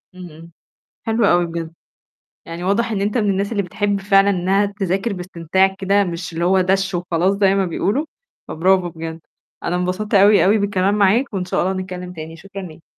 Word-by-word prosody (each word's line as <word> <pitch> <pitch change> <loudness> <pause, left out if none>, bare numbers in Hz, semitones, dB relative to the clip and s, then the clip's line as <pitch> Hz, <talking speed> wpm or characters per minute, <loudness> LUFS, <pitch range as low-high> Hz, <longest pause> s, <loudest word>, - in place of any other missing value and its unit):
إمم، 180 -1 -9
إمم. 165 +2 -14 0.5
حلو 225 -1 +1
أوي 175 -2 +3
بجد. 165 -1 -6 0.7
يعني 165 +1 -7
واضح 220 +5 0
إن 200 -2 -1
أنت 210 +4 0
من 210 -3 +1
الناس 200 +2 -1
اللي 205 -3 0
بتحب 205 +2 -1
فعلًا 195 0 +4
إنها 195 +2 +1
تذاكر 200 +1 -2
باستمتاع 180 +1 0
كده، 200 +1 +2
مش 175 -1 -5
اللي 170 +1 -1
هو 190 +1 +3
دَش 195 0 0
وخلاص 175 +2 0
زي 195 -1 +3
ما 195 -1 +1
بيقولوا، 205 - -1 0.5
فBravo 185 +2 +2
بجد. 160 0 -6 0.4
أنا 175 - -1
اتبسطت 185 +4 -2
أوي، 200 0 +6
أوي 210 +3 +4
بالكلام 200 0 +1
معاك، 210 +6 +2
وإن 185 -2 -2
شاء - - -1
الله 190 +2 0
نتكلّم 180 -1 -6
تاني، 160 0 -8
شكرًا 195 +3 -9
ليك. 165 -3 -11
190 Hz, 190 wpm, -19 LUFS, 175-200 Hz, 0.7 s, أوي